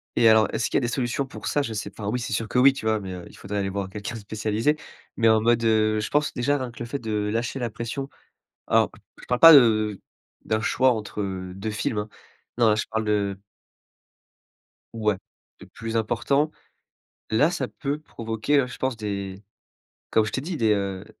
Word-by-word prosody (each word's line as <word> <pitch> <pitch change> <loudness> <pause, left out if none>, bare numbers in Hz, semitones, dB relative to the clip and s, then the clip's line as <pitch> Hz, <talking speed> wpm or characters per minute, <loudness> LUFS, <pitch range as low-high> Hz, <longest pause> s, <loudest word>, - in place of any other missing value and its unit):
Et 115 - +6
alors 110 -1 +6
est-ce - - -1
qu'il - - +1
y - - +4
a - - -5
des 120 - 0
solutions 125 +2 -1
pour 130 - -8
ça? 145 - +1
Je 115 -6 -3
sais 105 - -4
pas, 110 - -11
enfin, 100 - -1
oui, 125 - -1
c'est 120 - -4
sûr 110 +1 -1
que 125 - -2
oui, 135 +2 +7
tu 135 - -7
vois, 110 0 +2
mais 95 -2 -6
heu, 90 -1 -8
il - - -15
faudrait 105 +1 -5
aller 95 -1 -1
voir 95 0 -3
quelqu'un 105 +4 -6
de - - -6
spécialisé. 110 +6 0 0.4
Mais 115 -1 +4
en 110 0 +4
mode, 115 +1 +3
heu, 110 -1 +3
je 105 - -3
pense 150 +1 +1
déjà 140 +4 +1
rien 130 -3 -4
que 120 - -14
le 120 - -4
fait 140 +4 -4
de 105 -3 -2
lâcher 115 +4 -2
la 120 -2 -2
pression. 115 +5 -5 0.6
Alors, - - +3 0.3
je - - -12
parle 125 0 0
pas 165 0 +11
de 110 -6 +4 0.4
d'un 110 0 0
choix 130 +4 +3
entre 105 -2 -4 0.3
2 100 +3 -4
films 105 +1 -2
hein. 105 +1 -3 0.5
Non, 115 - +5
là, - - +4
je 105 - -1
parle 110 0 -1
de. 100 -2 0 1.6
Ouais, 105 -3 0 0.4
de - - -12
plus 115 0 -4
important. 130 +7 +1 0.8
Là, 130 +9 +4
ça 175 0 -2
peut 145 +1 -4
provoquer 115 0 -1
hein, 130 - +1
je - - -9
pense, 130 -1 -1
des 100 -3 -5 0.7
comme 110 - +4
je 105 - -4
t'ai 130 - -2
dit, 165 +3 -4
des 110 -4 +3
heu 100 -1 -3
110 Hz, 225 wpm, -25 LUFS, 105-125 Hz, 1.6 s, pas